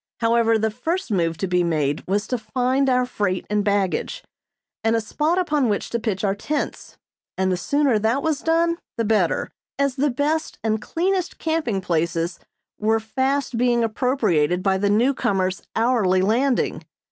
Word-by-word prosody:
However, 230 Hz, -1 st, +3 dB
the 220 Hz, 0 st, 0 dB
first 320 Hz, -, -3 dB
move 165 Hz, -4 st, 0 dB
to 195 Hz, -, -2 dB
be 180 Hz, -1 st, +2 dB
made 150 Hz, -3 st, 0 dB
was 205 Hz, +3 st, 0 dB
to 250 Hz, 0 st, -2 dB
find 255 Hz, +4 st, 0 dB
our 250 Hz, -1 st, +3 dB
freight 205 Hz, -6 st, -2 dB
and 210 Hz, -1 st, +2 dB
baggage, 200 Hz, -2 st, -1 dB, 0.6 s
and 225 Hz, +1 st, +2 dB
a -, -, +2 dB
spot 300 Hz, +10 st, -1 dB
upon 300 Hz, -8 st, +1 dB
which 205 Hz, -, -2 dB
to 235 Hz, -, 0 dB
pitch 215 Hz, -4 st, -2 dB
our 195 Hz, -1 st, +2 dB
tents, 285 Hz, +9 st, -4 dB, 0.4 s
and 190 Hz, 0 st, +1 dB
the -, -, +2 dB
sooner 275 Hz, +4 st, +1 dB
that 225 Hz, +6 st, +1 dB
was 315 Hz, -3 st, 0 dB
done 335 Hz, +1 st, +1 dB, 0.2 s
the 230 Hz, -, 0 dB
better, 205 Hz, -6 st, +1 dB, 0.3 s
as 280 Hz, -1 st, 0 dB
the 290 Hz, +2 st, +2 dB
test 295 Hz, +5 st, -1 dB
and 220 Hz, -1 st, 0 dB
cleanest 360 Hz, -, -1 dB
camping 315 Hz, -12 st, -1 dB
places 170 Hz, 0 st, -1 dB, 0.4 s
were 220 Hz, +1 st, +2 dB
fast 260 Hz, +3 st, -1 dB
being 240 Hz, -1 st, +2 dB
appropriated 215 Hz, -, +1 dB
by 190 Hz, -1 st, +2 dB
the 200 Hz, +1 st, +1 dB
newcomers 205 Hz, -5 st, +1 dB
hourly 220 Hz, -6 st, +2 dB
landing. 245 Hz, +6 st, +1 dB
225 Hz, 165 wpm, -22 LUFS, 195-270 Hz, 0.6 s, However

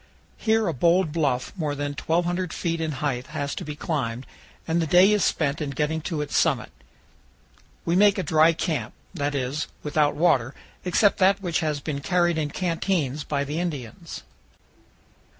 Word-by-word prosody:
Here 220 Hz, 0 st, +2 dB
a 170 Hz, -, 0 dB
bold 170 Hz, +4 st, +2 dB
bluff 140 Hz, -6 st, -1 dB
more 155 Hz, -5 st, -2 dB
than 145 Hz, 0 st, -3 dB
1,200 175 Hz, +3 st, -1 dB
feet 165 Hz, -2 st, -2 dB
in 160 Hz, -1 st, -2 dB
height 130 Hz, -3 st, -2 dB
has 145 Hz, -2 st, -3 dB
to -, -, -5 dB
be 150 Hz, 0 st, -6 dB
climbed, 130 Hz, -7 st, -3 dB, 0.4 s
and 165 Hz, +1 st, +1 dB
the 165 Hz, -, -1 dB
day 180 Hz, +6 st, +6 dB
is 210 Hz, -2 st, +2 dB
spent 150 Hz, 0 st, 0 dB
in 150 Hz, -, -2 dB
getting 150 Hz, +4 st, -1 dB
to 160 Hz, -2 st, -3 dB
its 150 Hz, -, -4 dB
summit. -, -, +1 dB, 1.1 s
We 170 Hz, -, +1 dB
make 205 Hz, +2 st, +5 dB
a 190 Hz, -, -1 dB
dry 160 Hz, -1 st, +4 dB
camp, 155 Hz, -9 st, -3 dB, 0.2 s
that 145 Hz, -4 st, -2 dB
is, 135 Hz, +3 st, -2 dB, 0.2 s
without 150 Hz, 0 st, +1 dB
water, 145 Hz, -6 st, +2 dB, 0.3 s
except 195 Hz, +3 st, +3 dB
that 195 Hz, +1 st, +4 dB
which 175 Hz, -4 st, -1 dB
has 155 Hz, -3 st, -1 dB
been 140 Hz, -1 st, -3 dB
carried 175 Hz, 0 st, +1 dB
in 150 Hz, -1 st, -1 dB
canteens 165 Hz, -4 st, -1 dB
by 140 Hz, -1 st, -1 dB
the 150 Hz, +3 st, -3 dB
Indians. 145 Hz, -11 st, -5 dB
155 Hz, 170 wpm, -25 LUFS, 145-175 Hz, 1.1 s, day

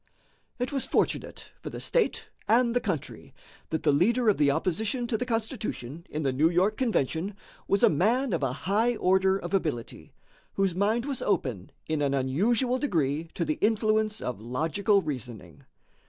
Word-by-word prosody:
It 250 Hz, 0 st, -2 dB
was 275 Hz, -2 st, 0 dB
fortunate -, -, -1 dB
for -, -, -6 dB
the -, -, -7 dB
state -, -, 0 dB, 0.2 s
and 235 Hz, +1 st, +4 dB
the -, -, +4 dB
country 180 Hz, -9 st, -5 dB, 0.3 s
that 160 Hz, -, -2 dB
the 150 Hz, -, +4 dB
leader 225 Hz, -, +3 dB
of 205 Hz, -, +3 dB
the 145 Hz, -1 st, +4 dB
opposition 215 Hz, -, 0 dB
to 235 Hz, -, -1 dB
the 250 Hz, +3 st, -2 dB
Constitution 215 Hz, -, -4 dB
in 155 Hz, +1 st, -3 dB
the 135 Hz, -2 st, 0 dB
New 150 Hz, +5 st, +3 dB
York 185 Hz, +5 st, +2 dB
convention 195 Hz, -, -1 dB, 0.3 s
was 200 Hz, -, +2 dB
a -, -, +9 dB
man 225 Hz, -, +2 dB
of 165 Hz, -, 0 dB
a 135 Hz, -3 st, 0 dB
high 210 Hz, -, +1 dB
order 190 Hz, -1 st, +3 dB
of 195 Hz, -, -7 dB
ability, 150 Hz, -11 st, -2 dB, 0.4 s
whose 195 Hz, -2 st, +1 dB
mind 215 Hz, +6 st, +1 dB
was 275 Hz, -3 st, -3 dB
open 130 Hz, -, -1 dB
in 155 Hz, -1 st, -1 dB
an 140 Hz, -1 st, +1 dB
unusual 220 Hz, -, +1 dB
degree 160 Hz, -, 0 dB
to 170 Hz, -, -1 dB
the 155 Hz, 0 st, -2 dB
influence 215 Hz, 0 st, +1 dB
of 125 Hz, -4 st, -4 dB
logical 165 Hz, -, +1 dB
reasoning. 120 Hz, -, -7 dB
190 Hz, 170 wpm, -27 LUFS, 145-225 Hz, 0.4 s, a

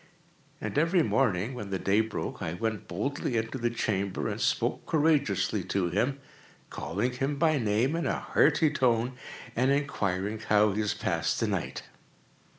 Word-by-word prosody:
And -, -, -1 dB
every 165 Hz, +2 st, +3 dB
morning, 110 Hz, -4 st, +1 dB
when 105 Hz, -5 st, -6 dB
the 95 Hz, -, -1 dB
day 100 Hz, +4 st, +2 dB
broke, 110 Hz, -1 st, -4 dB
I 80 Hz, -, -2 dB
went 110 Hz, +1 st, -3 dB
boldly 120 Hz, +6 st, -2 dB
into 115 Hz, +4 st, -2 dB
the 120 Hz, 0 st, +1 dB
chamber, 100 Hz, -4 st, -1 dB
and -, -, -4 dB
spoke -, -, 0 dB
courageously 150 Hz, -, +2 dB
to 95 Hz, -3 st, 0 dB
him, 125 Hz, +9 st, 0 dB, 0.5 s
calling 105 Hz, +9 st, -2 dB
him 135 Hz, +3 st, -1 dB
by 155 Hz, 0 st, +2 dB
name 115 Hz, +6 st, +1 dB
in 170 Hz, -, -1 dB
a -, -, 0 dB
hearty 150 Hz, 0 st, +3 dB
tone, 125 Hz, -4 st, +1 dB, 0.4 s
and 130 Hz, +3 st, +2 dB
inquiring 105 Hz, -8 st, 0 dB
how 105 Hz, -1 st, +3 dB
he 100 Hz, -, -2 dB
has 105 Hz, -, -1 dB
passed -, -, -1 dB
the -, -, +1 dB
night. -, -, -3 dB
115 Hz, 160 wpm, -29 LUFS, 105-140 Hz, 0.5 s, every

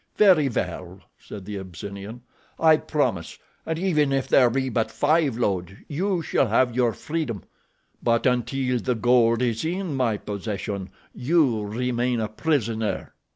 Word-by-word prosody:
"Very 180 Hz, -9 st, +5 dB
well," 90 Hz, -3 st, -4 dB, 0.2 s
said 100 Hz, -3 st, -10 dB
the 105 Hz, 0 st, -5 dB
Abyssinian, 100 Hz, +5 st, -8 dB, 0.4 s
"I 160 Hz, -1 st, +6 dB
promise, 120 Hz, -, -2 dB, 0.3 s
and 160 Hz, -, -1 dB
even 155 Hz, -6 st, +1 dB
if 135 Hz, -1 st, 0 dB
there 125 Hz, -3 st, +5 dB
be 130 Hz, +2 st, -1 dB
but 115 Hz, -3 st, 0 dB
five 150 Hz, -4 st, +1 dB
loads 95 Hz, -6 st, -1 dB
you 180 Hz, +3 st, -1 dB
shall 135 Hz, -, +1 dB
have 120 Hz, +2 st, +2 dB
your 125 Hz, -2 st, +3 dB
freedom; 150 Hz, -10 st, -4 dB, 0.6 s
but 115 Hz, -1 st, +1 dB
until 125 Hz, 0 st, +1 dB
the 125 Hz, +1 st, -1 dB
gold 115 Hz, +1 st, +3 dB
is 115 Hz, -2 st, -1 dB
in 175 Hz, 0 st, -2 dB
my 125 Hz, -5 st, +1 dB
possession 100 Hz, -1 st, -5 dB, 0.2 s
you 130 Hz, -6 st, +2 dB
remain 120 Hz, +2 st, -1 dB
a 110 Hz, -, -1 dB
prisoner." 115 Hz, -4 st, -1 dB
120 Hz, 145 wpm, -24 LUFS, 110-145 Hz, 0.6 s, I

